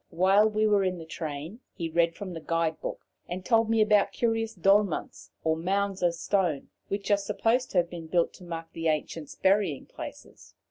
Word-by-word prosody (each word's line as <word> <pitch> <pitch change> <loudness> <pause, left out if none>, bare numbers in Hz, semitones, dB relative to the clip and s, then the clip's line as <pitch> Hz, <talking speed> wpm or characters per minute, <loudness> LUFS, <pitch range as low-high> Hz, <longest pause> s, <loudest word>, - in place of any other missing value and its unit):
While 190 +5 +4
we 215 0 +1
were 205 -2 +4
in 185 -1 0
the 165 - -8
train 160 - -6 0.2
he 165 - -3
read 170 +1 +2
from 190 -3 -6
the 165 - -5
guide 165 0 -1
book, - - -5 0.2
and 185 +1 -5
told 225 -2 +3
me 225 -1 +3
about 210 -1 +4
curious 225 -1 -1
"dolmens," 195 0 +1
or 160 0 +2
mounds 195 +3 -1
of 175 -1 +2
stone, 175 -6 0 0.2
which 200 +1 -3
are 205 - +6
supposed 225 +5 0
to - - -2
have 175 -1 +3
been 170 -2 -7
built 170 +1 +1
to - - -14
mark 165 -1 -7
the 165 0 -2
ancients' 155 0 -2
burying 190 -7 +2
places. - - -11
185 Hz, 195 wpm, -28 LUFS, 165-205 Hz, 0.2 s, are